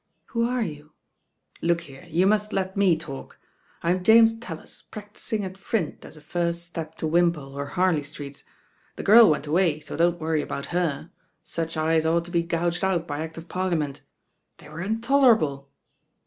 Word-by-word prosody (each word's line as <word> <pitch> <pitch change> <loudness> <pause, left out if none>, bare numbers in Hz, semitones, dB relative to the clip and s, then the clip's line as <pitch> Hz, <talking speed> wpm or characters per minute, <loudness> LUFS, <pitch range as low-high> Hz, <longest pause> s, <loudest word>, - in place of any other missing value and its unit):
"Who 230 0 0
are 250 -1 0
you?" 150 -4 -8 0.7
"Look 170 0 +1
here, 135 +5 -13
you 170 +4 +2
must 210 +1 +2
let 190 -1 -1
me 195 -5 +4
talk. 150 -4 -9 0.5
I'm 180 +2 +1
Jamet 225 +2 +6
raUif, 170 -9 -10
practising 210 0 -5
at 190 +1 -9
Print 195 -6 -2
as - - -12
a - - -14
first 170 +1 -2
step 160 -2 -7
to 160 - -2
Wimpole 165 -4 +1
or 140 0 -4
Harlcy 180 -4 +1
Streets. 145 -1 -9 0.5
The - - -6
girl 225 +2 +8
went 150 -1 0
away, 160 0 +2
so - - -7
don't 175 +2 +2
worry 160 -1 0
about 140 - -5
her. 170 -3 -1 0.3
Such 165 0 -4
eyes 160 0 +2
ought 170 +1 +2
to 175 - -10
be 170 -1 +2
gouged 170 +1 -1
out 180 -3 +1
^ - - -3
Act 160 +2 -5
of 165 +1 -9
Parliament 170 -7 -2 0.6
They - - -14
were 155 +2 -7
intolerable. 220 - +2
170 Hz, 175 wpm, -25 LUFS, 155-190 Hz, 0.7 s, girl